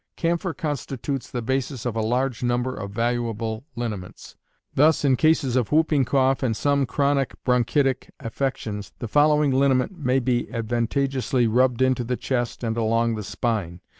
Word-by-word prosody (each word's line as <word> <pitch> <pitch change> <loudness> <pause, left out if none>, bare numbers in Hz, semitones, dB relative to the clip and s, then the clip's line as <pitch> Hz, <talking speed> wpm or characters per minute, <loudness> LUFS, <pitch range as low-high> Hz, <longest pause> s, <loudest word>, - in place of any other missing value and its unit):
Camphor 170 +1 -1
constitutes 140 -4 -4
the 120 -2 -4
basis 130 0 -2
of 120 -2 -2
a 110 - 0
large 125 +2 0
number 125 +1 0
of 100 -1 -6
valuable 115 +1 -2
liniments. 110 -6 -6 0.4
Thus, 150 +1 +4
in 135 -2 +4
cases 155 -4 +2
of 125 -4 0
whooping 150 -3 +3
cough 135 +1 +2
and 115 -5 0
some 140 -2 +1
chronic 140 +1 0
bronchitic 130 +2 +1
affections, 110 -4 -4
the 120 - -5
following 150 +3 +3
liniment 135 +5 +2
may 130 -3 +1
be 125 -2 0
advantageously 120 +2 0
rubbed 125 +2 +2
into 130 -1 +2
the 125 +1 -2
chest 120 -2 -2
and 115 0 -1
along 115 +1 +1
the 110 - -4
spine. 100 -6 -2
125 Hz, 155 wpm, -24 LUFS, 115-135 Hz, 0.4 s, Thus